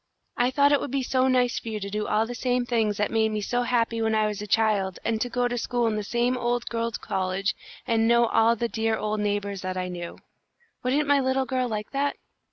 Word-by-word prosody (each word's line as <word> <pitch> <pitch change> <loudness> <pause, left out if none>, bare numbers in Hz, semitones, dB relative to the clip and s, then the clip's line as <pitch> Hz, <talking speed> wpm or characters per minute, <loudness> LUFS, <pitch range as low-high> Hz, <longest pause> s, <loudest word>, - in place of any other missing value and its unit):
I 245 +1 +2
thought 280 +2 +3
it 285 - +4
would - - -4
be 270 +1 -1
so 260 +1 +2
nice 250 -1 +2
for 230 - -7
you 215 -1 -3
to 200 0 -5
do 210 +1 -2
all 215 +1 +2
the 245 - -6
same 250 0 0
things 225 -4 0
that 205 - 0
made 220 -1 +2
me 215 -1 -2
so 245 +4 0
happy 230 -2 0
when 220 0 +1
I 215 0 +3
was 210 -1 -3
a 210 - -6
child, 205 -4 +1
and 225 -1 0
go 245 0 +1
to 245 0 -2
school 240 +1 0
in 225 -1 +1
the 210 - -1
same 240 +4 0
old 240 -1 -1
Girls' 230 -1 -2
College 190 +2 -1 0.3
and 225 -1 +2
know 235 0 +5
all 230 0 +3
the 235 +1 -1
dear 225 -1 -1
old 215 0 -2
neighbours 205 -1 -2
that 185 0 -4
I 180 0 -2
knew. 175 -1 -6 0.6
Wouldn't 280 +4 +1
my 285 0 +4
little 265 0 +1
girl 255 -1 -1
like 210 -2 -4
that?" 280 +1 0
230 Hz, 245 wpm, -26 LUFS, 210-245 Hz, 0.6 s, know